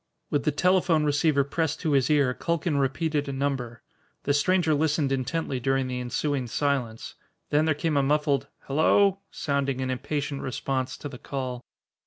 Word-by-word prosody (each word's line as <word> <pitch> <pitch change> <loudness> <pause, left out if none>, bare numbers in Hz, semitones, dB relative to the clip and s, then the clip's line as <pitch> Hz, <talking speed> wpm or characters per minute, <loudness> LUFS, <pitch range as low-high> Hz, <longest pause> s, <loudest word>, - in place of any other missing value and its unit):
With 145 -2 0
the 150 - +3
telephone 180 0 +3
receiver 145 -1 +2
pressed 160 +2 -1
to 160 - 0
his 135 -1 +3
ear, 140 -4 +3
Culkin 170 0 -1
repeated 145 +2 0
a - - -1
number. 135 -4 -3 0.4
The 145 - +1
stranger 165 +2 +2
listened 150 -1 +1
intently 135 +1 -1
during 135 +1 0
the 125 -1 -3
ensuing 130 +1 -1
silence. 125 -4 -2 0.4
Then 150 +1 +3
there 155 -2 +2
came 155 0 0
a - - +4
muffled 140 -1 +1
"hello" 195 +7 +3
sounding 140 -2 -1
in 130 0 -1
impatient 140 +2 -3
response 130 0 -2
to - - -6
the 130 -3 -9
call. 130 -3 -4
140 Hz, 165 wpm, -26 LUFS, 135-155 Hz, 0.4 s, a